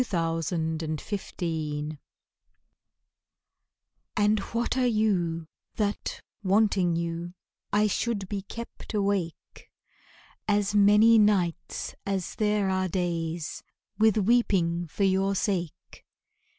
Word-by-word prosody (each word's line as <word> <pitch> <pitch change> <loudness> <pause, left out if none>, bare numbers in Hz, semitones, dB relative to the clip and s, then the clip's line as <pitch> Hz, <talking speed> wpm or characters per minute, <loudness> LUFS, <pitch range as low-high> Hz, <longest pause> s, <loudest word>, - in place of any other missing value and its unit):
The - - 0
Philosopher 160 -2 -2 2.2
And 210 0 +3
what 235 +2 0
are 255 -1 +2
you 185 -8 +1 0.3
that, 205 -1 -2 0.2
wanting 195 -3 +3
you 170 +1 -3 0.4
I 210 +1 +3
should 210 -1 -1
be 200 0 -3
kept 230 +2 -8
awake 195 -5 -2 0.8
As 205 -1 +1
many 210 +2 +6
nights 185 -5 +1
as 195 -3 -2
there 210 -2 +1
are 185 0 +1
days 170 -2 -2 0.4
With 220 -1 +4
weeping 185 -6 +2
for 200 - -2
your 195 +1 +2
sake? 180 -5 -3
190 Hz, 95 wpm, -27 LUFS, 170-210 Hz, 2.2 s, many